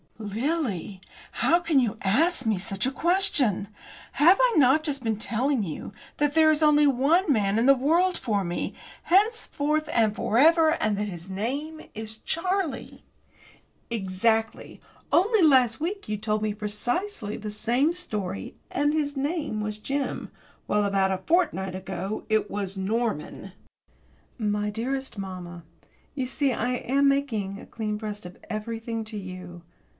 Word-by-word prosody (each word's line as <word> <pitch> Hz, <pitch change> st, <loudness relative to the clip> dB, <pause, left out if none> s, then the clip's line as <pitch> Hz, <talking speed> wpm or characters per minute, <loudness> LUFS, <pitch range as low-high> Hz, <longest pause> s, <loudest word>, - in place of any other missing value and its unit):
"Lily! 215 Hz, -, -2 dB, 0.3 s
How 340 Hz, -, +3 dB
can 335 Hz, -5 st, +2 dB
you 230 Hz, -3 st, 0 dB
ask 310 Hz, -, +3 dB
me 220 Hz, -3 st, +1 dB
such 195 Hz, +2 st, -2 dB
a 265 Hz, -, 0 dB
question? 285 Hz, -, +2 dB, 0.5 s
Have 345 Hz, +6 st, +6 dB
I -, -, +4 dB
not 285 Hz, +2 st, +5 dB
just 280 Hz, -4 st, -2 dB
been 220 Hz, -2 st, 0 dB
telling 240 Hz, +3 st, 0 dB
you 170 Hz, +3 st, -6 dB, 0.2 s
that 295 Hz, -1 st, +1 dB
there 315 Hz, 0 st, +5 dB
is 310 Hz, 0 st, +1 dB
only 300 Hz, -1 st, +5 dB
one 290 Hz, +7 st, +3 dB
man 205 Hz, -4 st, +2 dB
in 235 Hz, -, +2 dB
the 275 Hz, +1 st, +7 dB
world 335 Hz, +8 st, +2 dB
for 205 Hz, -4 st, -1 dB
me, 175 Hz, -1 st, -3 dB, 0.3 s
henceforth 320 Hz, -7 st, +1 dB
and 220 Hz, -3 st, +2 dB
for 220 Hz, -, -1 dB
ever, 320 Hz, +3 st, +6 dB
and 215 Hz, -10 st, 0 dB
that 210 Hz, +1 st, -2 dB
his 175 Hz, -1 st, -8 dB
name 280 Hz, +11 st, -4 dB
is 220 Hz, 0 st, -5 dB
Charlie?" 360 Hz, -, -2 dB, 0.9 s
"Exactly. 220 Hz, +1 st, -1 dB, 0.3 s
Only 420 Hz, +4 st, +4 dB
last 260 Hz, -7 st, +4 dB
week 380 Hz, +6 st, -4 dB
you 210 Hz, 0 st, -2 dB
told 215 Hz, 0 st, -1 dB
me 215 Hz, -1 st, 0 dB
precisely 215 Hz, -, -3 dB
the 210 Hz, -1 st, -6 dB
same 240 Hz, +8 st, +1 dB
story, 210 Hz, -, -4 dB, 0.2 s
and 290 Hz, +2 st, +1 dB
his 290 Hz, -2 st, -1 dB
name 290 Hz, -5 st, -2 dB
was 210 Hz, 0 st, -4 dB
Jim, 275 Hz, +5 st, -3 dB, 0.4 s
while 210 Hz, 0 st, +2 dB
about 195 Hz, -1 st, +1 dB
a 190 Hz, -, -1 dB
fortnight 300 Hz, -, +1 dB
ago, 190 Hz, +2 st, -5 dB
it 215 Hz, -1 st, +1 dB
was 195 Hz, -1 st, -4 dB
Norman." 215 Hz, -3 st, -3 dB, 0.8 s
My 210 Hz, -2 st, -1 dB
dearest 265 Hz, +4 st, -4 dB
mamma, 180 Hz, -3 st, -7 dB, 0.5 s
you 265 Hz, -3 st, -1 dB
see 270 Hz, 0 st, 0 dB
I 240 Hz, +2 st, -1 dB
am 275 Hz, +3 st, +1 dB
making 225 Hz, -9 st, 0 dB
a -, -, -11 dB
clean 215 Hz, -2 st, -3 dB
breast 210 Hz, -2 st, -6 dB
of 180 Hz, -, -10 dB
everything 225 Hz, +1 st, -4 dB
to 215 Hz, 0 st, -7 dB
you. 185 Hz, -3 st, -8 dB
230 Hz, 150 wpm, -26 LUFS, 205-295 Hz, 0.9 s, the